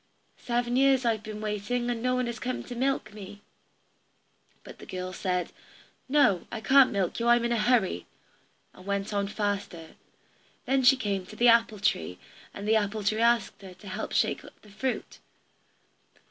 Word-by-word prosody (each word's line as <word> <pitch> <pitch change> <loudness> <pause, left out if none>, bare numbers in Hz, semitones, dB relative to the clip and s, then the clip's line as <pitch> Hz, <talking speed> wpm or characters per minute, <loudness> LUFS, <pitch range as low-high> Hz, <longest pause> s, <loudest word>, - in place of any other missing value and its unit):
Seven 240 0 -1
years 270 -1 +4
have 235 - +3
I - - -4
been 215 0 -8
waiting, 215 +3 -2
and 230 -1 -3
no 255 +1 +1
one 250 0 0
has 235 -1 -5
come 255 0 -3
to 245 - -8
milk 265 -2 -1
me." 205 0 -11 1.2
But - - -12
the - - -12
girl 185 0 -5
said, 180 -1 -2 0.6
"No, 260 - +3
I 230 - -4
can't 265 +3 +5
milk 195 -1 -1
you, 235 - -1
I'm 240 0 +4
in 235 - -1
a 235 - +1
hurry," 210 - +1 0.7
and 185 - -15
went 200 +1 -2
on 200 -1 0
faster. 200 -6 -3 0.8
Then 270 0 +2
she 260 +1 +6
came 200 -6 -2
to 215 - -11
the 240 +2 +5
apple 230 -2 +4
tree, 90 - -1 0.3
and 200 +1 -7
the 220 +1 +4
apple 210 0 -2
tree 215 +3 0
asked 235 -3 +2
her 190 -2 -11
to 185 +3 -14
help 185 - -5
shake - - +1 0.2
the 210 - -16
fruit. 255 +5 -4
215 Hz, 180 wpm, -28 LUFS, 200-245 Hz, 1.2 s, she